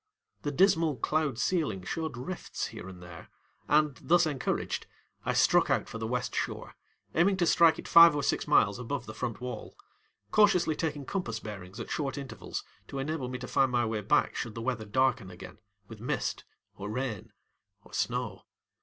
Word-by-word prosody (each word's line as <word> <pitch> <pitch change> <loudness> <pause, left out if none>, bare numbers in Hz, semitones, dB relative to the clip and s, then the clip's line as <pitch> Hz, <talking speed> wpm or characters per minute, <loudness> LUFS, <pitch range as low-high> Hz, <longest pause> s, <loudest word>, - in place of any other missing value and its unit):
The 145 - -2
dismal 165 -2 +3
cloud 150 -2 0
ceiling 145 - 0
showed 160 - -3
rifts 160 +9 -4
here 95 - -8
and 90 -2 -11
there, 90 0 -11 0.4
and, 150 -2 +3
thus 175 +1 +4
encouraged, 145 -5 -2 0.4
I - - +1
struck - - +4
out - - +1
for 115 - -7
the 110 - -3
west 125 +1 -2
shore, - - -3 0.4
aiming 190 +4 +3
to 175 - +2
strike 165 0 +5
it - - -8
five 170 -2 +9
or 145 - -1
six - - 0
miles 105 -8 +4
above 125 +1 -4
the 110 - -8
front 115 0 -4
wall, 125 0 -7 0.5
cautiously 180 -7 +4
taking 150 -3 -3
compass 130 - -3
bearings 100 -2 -8
at - - -6
short 140 -5 -2
intervals 140 -2 -6 0.2
to 140 - -6
enable 135 -1 -2
me 125 - -4
to 125 - -7
find 135 -2 +2
my 120 -1 +2
way 110 -1 -2
back 110 +9 +2
should 115 -3 -4
the 115 - -5
weather 120 -3 -2
darken 130 -2 +1
again 90 +3 -11 0.3
with 110 -1 -10
mist 120 - -2 0.3
or 100 +1 -6
rain 115 -3 -4 0.5
or - - -19
snow. - - -2
130 Hz, 180 wpm, -30 LUFS, 110-155 Hz, 0.5 s, five